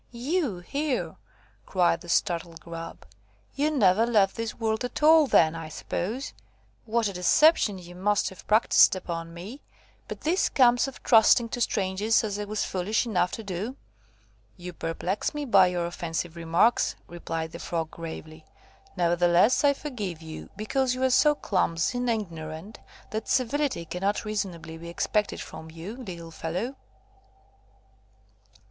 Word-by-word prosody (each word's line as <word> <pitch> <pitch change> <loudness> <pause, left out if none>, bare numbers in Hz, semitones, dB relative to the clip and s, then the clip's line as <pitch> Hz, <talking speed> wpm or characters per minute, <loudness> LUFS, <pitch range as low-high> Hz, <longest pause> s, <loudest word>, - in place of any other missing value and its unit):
"You 255 - -1
here!" 280 +7 -2 0.5
cried 175 -3 +2
the 175 - -11
startled 170 -2 0
Grub; 165 0 -9 0.5
"you 290 +3 +1
never 215 -8 +4
left 205 -5 +3
this 230 -1 -4
world 220 0 -1
at 245 +4 -4
all, 315 -1 +7
then, 160 -9 +4
I 165 -1 -7
suppose. 220 - -4 0.5
What 230 0 +1
a 200 - -4
deception 205 - +4
you 175 -1 -11
must 205 +3 +1
have 190 - -14
practised 215 -2 +5
upon 165 -2 -5
me! 195 +12 -9 0.5
But - - -7
this 345 +5 +1
comes 245 -1 +4
of 270 - -10
trusting 230 +1 +5
to 245 - -4
strangers, 205 +1 +1
as 205 -1 -3
I 210 - -3
was 210 +1 -2
foolish 195 +6 -1
enough 180 -6 +1
to 225 - -5
do." 200 +6 -4 0.8
"You 180 0 -8
perplex 175 - -3
me 295 -1 -3
by 195 -7 +6
your 175 -1 -1
offensive 170 -1 -4
remarks," 170 +8 +2
replied 165 -1 -5
the - - -8
Frog, 165 -2 -3
gravely. 160 -1 -8 0.5
"Nevertheless, 175 - +3
I 285 -1 +5
forgive 215 - -5
you, 160 -1 -9
because 250 +5 0
you 255 - -3
are 260 - +3
so 295 +3 +5
clumsy 185 - 0
and 245 0 -1
ignorant, 170 -3 -5 0.3
that 220 0 -4
civility 260 - 0
cannot 195 +6 -2
reasonably 170 -6 -4
be 170 +1 -8
expected 210 +4 -1
from 160 - -9
you, 165 +7 -8
little 175 -9 -8
fellow. 180 +11 -4
195 Hz, 150 wpm, -27 LUFS, 170-240 Hz, 0.8 s, all